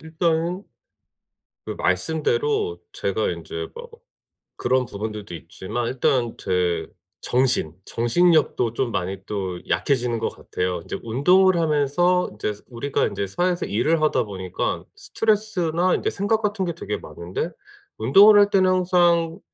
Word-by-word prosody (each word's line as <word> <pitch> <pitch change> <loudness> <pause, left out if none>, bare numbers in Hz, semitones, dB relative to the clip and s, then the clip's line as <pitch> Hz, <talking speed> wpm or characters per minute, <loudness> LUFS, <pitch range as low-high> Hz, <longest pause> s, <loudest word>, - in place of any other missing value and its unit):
일단은 165 +3 -1 1.0
그 - - -3
말씀대로 435 -1 0
제가 405 - -1
인제 420 +1 -5
뭐 475 0 -9 0.7
그런 130 0 +1
부분들도 105 -3 -6
있지만 95 +8 -5
일단 125 -2 0
제 90 -1 -1 0.3
정신 125 - +1
정신력도 125 -1 +2
좀 120 -1 -1
많이 95 0 -2
또 95 -4 -4
약해지는 120 +5 0
것 110 - -1
같아요. 90 -1 -3
인제 - - -5
운동을 180 +11 +4
하면서 165 +3 +2
인제 105 0 -3 0.2
우리가 130 +3 -1
인제 100 - -3
사회에서 175 - -1
일을 155 +10 +1
하다 155 - +2
보니깐 95 -3 -4
스트레스나 185 -6 0
인제 - - -1
생각 210 +3 0
같은 205 -2 -1
게 170 - -2
되게 - - -4
많은데 85 +2 -5 0.5
운동을 200 - +7
할 205 0 +5
때는 190 -2 +3
항상 175 -1 +2
155 Hz, 290 characters per minute, -23 LUFS, 110-185 Hz, 1.0 s, 운동을